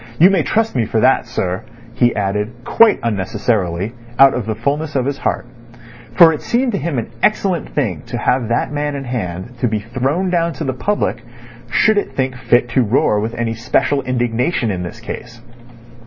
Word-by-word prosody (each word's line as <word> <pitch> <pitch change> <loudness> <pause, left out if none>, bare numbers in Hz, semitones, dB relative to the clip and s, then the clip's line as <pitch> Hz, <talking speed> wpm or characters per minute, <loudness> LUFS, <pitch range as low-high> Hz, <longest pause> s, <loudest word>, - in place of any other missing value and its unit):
"You 180 +4 +7
may 190 -4 +3
trust 225 +5 0
me 120 -3 +1
for 110 - 0
that, 130 +1 +3
sir," 95 -6 -2 0.3
he 120 -1 +2
added, 105 +2 -1
quite 225 -2 +5
unnecessarily, 100 -2 -1 0.2
out 135 0 +7
of 120 -4 -3
the 110 - -1
fulness 145 +6 -2
of 130 -2 +1
his 140 0 -2
heart; - - -1 0.7
for 165 -1 +8
it 150 - -5
seemed 245 +1 0
to 200 - -1
him 155 -2 -2
an 115 - -3
excellent 195 -6 +1
thing 105 - -1
to 120 - -4
have 125 0 +1
that 120 - 0
man 145 0 -2
in 140 - -4
hand 120 -2 -5
to 125 - +1
be 110 -1 0
thrown 130 - -1
down 170 -1 +1
to - - -5
the 135 -3 -1
public 205 +11 -1 0.5
should 215 -1 +3
it - - -6
think 130 -1 -1
fit 120 0 +2
to 130 - +2
roar 110 -2 +2
with 110 +3 -3
any 115 -1 -1
special 125 +4 0
indignation 120 0 0
in 90 -2 -3
this 85 -2 -7
case. 120 - -8
125 Hz, 195 wpm, -18 LUFS, 110-150 Hz, 0.7 s, for